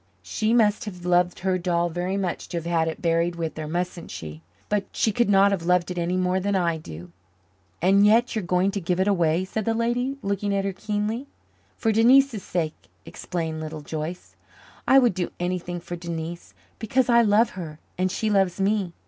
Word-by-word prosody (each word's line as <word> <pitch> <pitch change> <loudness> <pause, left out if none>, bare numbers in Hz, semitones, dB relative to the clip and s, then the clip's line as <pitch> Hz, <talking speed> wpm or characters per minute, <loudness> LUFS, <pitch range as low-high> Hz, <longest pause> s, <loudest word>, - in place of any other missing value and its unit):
She 215 0 -1
must 215 -4 +3
have 180 -4 -8
loved 180 0 +2
her 185 0 0
doll 175 -1 +1
very 180 +3 -2
much 190 -3 -3
to 175 - -3
have 165 - -4
had 165 -1 +1
it 160 - -5
buried 170 +1 +1
with 165 -2 -4
her, 155 -1 -5
mustn't 175 +1 -3
she? 80 0 -8 0.3
But 205 -1 0
she 220 - +1
could 235 +1 +1
not 200 0 +5
have 195 -3 -1
loved 180 0 +2
it 180 - -3
any 175 +2 0
more 185 0 +1
than 200 +1 -1
I 170 -3 +1
do." 85 - -10 0.7
"And 195 +2 +5
yet 230 +4 +4
you 220 - 0
are - - -9
going 180 +2 +1
to 200 - -3
give 180 +1 -1
it 190 - +2
away?" 175 -2 +2
said 215 +3 -3
the 225 +2 0
lady, 245 +4 -1
looking 200 0 -1
at 195 0 0
her 195 - -1
keenly. 210 +6 -3 0.5
"For 225 - +1
Denise's 240 +1 +4
sake," 165 -4 -4 0.2
explained 160 -3 -4
Little 155 0 -6
Joyce. 155 +4 -6 0.5
"I 270 - +6
would 245 -6 +5
do 175 -1 -3
anything 175 0 -3
for 175 +1 -7
Denise 170 0 -6 0.2
because 245 +3 +1
I 235 -1 +5
love 220 +1 +3
her 160 -5 -7 0.2
and 185 +1 0
she 220 +2 -1
loves 195 -2 +2
me. 195 -3 0
185 Hz, 205 wpm, -24 LUFS, 170-210 Hz, 0.7 s, I